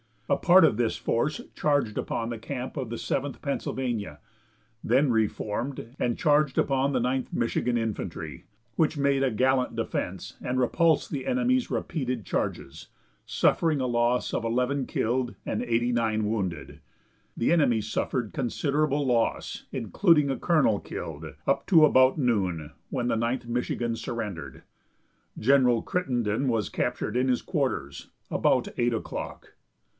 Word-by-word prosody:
A -, -, +2 dB
part 180 Hz, +1 st, +6 dB
of 110 Hz, -, +4 dB
this 120 Hz, -2 st, +1 dB
force 145 Hz, +6 st, -1 dB
charged 145 Hz, -8 st, +1 dB
upon 115 Hz, 0 st, -2 dB
the 115 Hz, -2 st, -5 dB
camp 130 Hz, +4 st, -5 dB
of 130 Hz, -4 st, -3 dB
the 115 Hz, -, -4 dB
Seventh 135 Hz, +4 st, -2 dB
Pennsylvania, 120 Hz, -, -3 dB, 0.6 s
then 130 Hz, +3 st, +3 dB
reformed, 115 Hz, +3 st, -2 dB
and 120 Hz, -1 st, 0 dB
charged 150 Hz, -2 st, +2 dB
upon 135 Hz, +1 st, +2 dB
the 125 Hz, -, +1 dB
Ninth 130 Hz, +1 st, -1 dB
Michigan 120 Hz, +1 st, 0 dB
Infantry, 85 Hz, -, -4 dB, 0.3 s
which 160 Hz, -1 st, +2 dB
made 140 Hz, -1 st, +2 dB
a 135 Hz, -, +3 dB
gallant 130 Hz, +3 st, +1 dB
defense -, -, -4 dB
and 125 Hz, +1 st, -2 dB
repulsed 160 Hz, +5 st, +2 dB
the 140 Hz, -3 st, -4 dB
enemy's 255 Hz, 0 st, +1 dB
repeated 130 Hz, -, -2 dB
charges, 70 Hz, -, -3 dB, 0.4 s
suffering 155 Hz, -4 st, +2 dB
a -, -, 0 dB
loss 120 Hz, +1 st, +1 dB
of 115 Hz, -, -1 dB
eleven 125 Hz, +3 st, 0 dB
killed 120 Hz, +2 st, -1 dB
and -, -, -2 dB
eighty 120 Hz, 0 st, +1 dB
nine 110 Hz, -2 st, +1 dB
wounded. 95 Hz, -7 st, -3 dB, 0.6 s
The 115 Hz, -, +1 dB
enemy 135 Hz, -10 st, +3 dB
suffered 120 Hz, +1 st, -2 dB
considerable 145 Hz, +3 st, 0 dB
loss, 120 Hz, -3 st, 0 dB
including 150 Hz, -, +3 dB
a 135 Hz, -, -3 dB
colonel 150 Hz, -, +3 dB
killed, -, -, -7 dB, 0.2 s
up -, -, 0 dB
to 165 Hz, -5 st, +6 dB
about 130 Hz, -1 st, +5 dB
noon, 95 Hz, -, 0 dB, 0.2 s
when 125 Hz, -2 st, -2 dB
the -, -, +1 dB
Ninth 120 Hz, +2 st, -1 dB
Michigan 120 Hz, -1 st, -2 dB
surrendered. 95 Hz, -, -5 dB, 0.7 s
General 125 Hz, -1 st, +4 dB
Crittenden 125 Hz, -7 st, -1 dB
was 115 Hz, -4 st, 0 dB
captured 125 Hz, -2 st, -2 dB
in 130 Hz, +1 st, +2 dB
his 125 Hz, -2 st, +1 dB
quarters, 130 Hz, -, -2 dB, 0.2 s
about -, -, +2 dB
eight 120 Hz, 0 st, +2 dB
o'clock. 110 Hz, -, -6 dB
125 Hz, 140 wpm, -27 LUFS, 115-140 Hz, 0.7 s, part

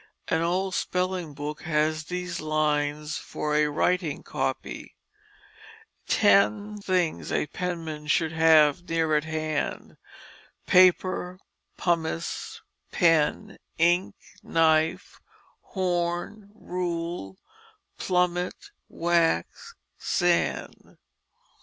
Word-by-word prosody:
An 160 Hz, -, +1 dB
old 185 Hz, +3 st, 0 dB
spelling 180 Hz, -4 st, -2 dB
book 150 Hz, +2 st, -5 dB
has 155 Hz, 0 st, 0 dB
these 180 Hz, 0 st, -4 dB
lines 150 Hz, -1 st, -1 dB
for 150 Hz, 0 st, -4 dB
a 150 Hz, 0 st, +3 dB
"writing 165 Hz, +1 st, 0 dB
copy 135 Hz, -2 st, -4 dB, 0.5 s
": -, -, -22 dB
"X 105 Hz, -, +3 dB
things 180 Hz, -4 st, 0 dB
a -, -, +1 dB
penman 160 Hz, -2 st, -5 dB
should 160 Hz, +1 st, +2 dB
have 160 Hz, 0 st, +4 dB
near 165 Hz, -2 st, +1 dB
at 150 Hz, 0 st, +1 dB
hand 155 Hz, -1 st, -3 dB, 0.7 s
Paper, 185 Hz, 0 st, +3 dB, 0.4 s
pomice, 165 Hz, -1 st, -2 dB, 0.3 s
pen, 165 Hz, -4 st, +2 dB, 0.2 s
ink, 175 Hz, +3 st, +2 dB, 0.3 s
knife, 160 Hz, -6 st, +1 dB, 0.4 s
horn, 180 Hz, +2 st, -2 dB
rule, 170 Hz, -, -4 dB, 0.6 s
plummet, 180 Hz, -, -1 dB, 0.2 s
wax, 170 Hz, -, 0 dB, 0.2 s
sand." 175 Hz, -1 st, -1 dB
165 Hz, 85 wpm, -26 LUFS, 155-180 Hz, 0.7 s, have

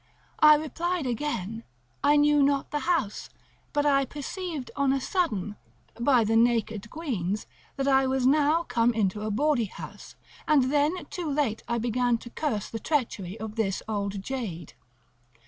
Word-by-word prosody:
I 305 Hz, -1 st, +8 dB
replied 330 Hz, +2 st, -2 dB
again, 230 Hz, -4 st, -3 dB, 0.4 s
I 290 Hz, -, +5 dB
knew 295 Hz, 0 st, +4 dB
not 280 Hz, 0 st, +1 dB
the 295 Hz, -, 0 dB
house; 270 Hz, -, 0 dB, 0.4 s
but 290 Hz, -1 st, +1 dB
I 275 Hz, -1 st, +4 dB
perceived, 295 Hz, 0 st, -5 dB
on 280 Hz, -1 st, +2 dB
a 275 Hz, -, +1 dB
sudden, 215 Hz, -, -1 dB, 0.4 s
by 245 Hz, -1 st, +4 dB
the 220 Hz, +1 st, +1 dB
naked 225 Hz, -3 st, +1 dB
queans, 215 Hz, -, -3 dB, 0.3 s
that 275 Hz, 0 st, -1 dB
I 265 Hz, -1 st, +4 dB
was 260 Hz, -1 st, 0 dB
now 300 Hz, +4 st, +4 dB
come 240 Hz, -5 st, +1 dB
into 210 Hz, -1 st, 0 dB
a 215 Hz, -, -2 dB
bawdy 265 Hz, +2 st, +2 dB
house, -, -, -10 dB, 0.3 s
and 275 Hz, -4 st, +4 dB
then 300 Hz, +5 st, +1 dB
too 345 Hz, -4 st, -3 dB
late 275 Hz, -7 st, 0 dB
I 235 Hz, -, 0 dB
began 240 Hz, +1 st, +1 dB
to 240 Hz, +1 st, -12 dB
curse 220 Hz, -10 st, -2 dB
the 225 Hz, -, -6 dB
treachery 225 Hz, -, -2 dB
of 220 Hz, +1 st, -6 dB
this 195 Hz, -4 st, -1 dB
old 200 Hz, -2 st, -3 dB
jade. 200 Hz, -, -5 dB
255 Hz, 160 wpm, -27 LUFS, 220-295 Hz, 0.4 s, I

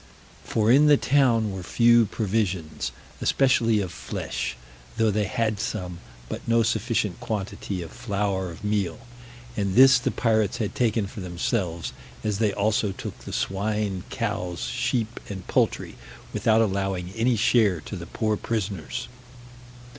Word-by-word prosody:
For 110 Hz, 0 st, +2 dB
in 145 Hz, +4 st, +6 dB
the 145 Hz, -1 st, +7 dB
town 120 Hz, -7 st, +3 dB
were 95 Hz, -1 st, -5 dB
few 115 Hz, +4 st, +4 dB
provisions, 95 Hz, -9 st, -1 dB, 0.3 s
especially 115 Hz, -5 st, +3 dB
of 95 Hz, -3 st, -4 dB
flesh, 65 Hz, -6 st, -4 dB, 0.4 s
though 110 Hz, -1 st, +3 dB
they 105 Hz, 0 st, +1 dB
had 110 Hz, -1 st, -1 dB
some, 90 Hz, -6 st, -3 dB, 0.3 s
but -, -, -5 dB
no 115 Hz, 0 st, +4 dB
sufficient 110 Hz, -3 st, 0 dB
quantity 100 Hz, -3 st, -4 dB
of 80 Hz, -, -9 dB
flour 100 Hz, -4 st, -2 dB
of 85 Hz, +6 st, -10 dB
meal, 100 Hz, -5 st, -1 dB, 0.5 s
and 100 Hz, -3 st, -1 dB
this 130 Hz, 0 st, +8 dB
the -, -, 0 dB
pirates 110 Hz, -1 st, +1 dB
had 110 Hz, -4 st, -2 dB
taken 115 Hz, -3 st, +1 dB
for 100 Hz, -, -8 dB
themselves, 90 Hz, -1 st, -2 dB, 0.3 s
as 105 Hz, -2 st, -1 dB
they 110 Hz, -2 st, +3 dB
also 105 Hz, 0 st, +1 dB
took -, -, -6 dB
the -, -, -9 dB
swine, 100 Hz, -, -1 dB
cows, 90 Hz, -1 st, -3 dB
sheep, 110 Hz, -, -1 dB
and 95 Hz, -3 st, -6 dB
poultry, -, -, 0 dB, 0.4 s
without 110 Hz, 0 st, +3 dB
allowing 95 Hz, -3 st, -1 dB
any 115 Hz, +3 st, +2 dB
share 110 Hz, -5 st, +3 dB
to -, -, -7 dB
the -, -, -7 dB
poor 110 Hz, -2 st, 0 dB
prisoners. 100 Hz, -, -3 dB
105 Hz, 145 wpm, -25 LUFS, 95-115 Hz, 0.5 s, this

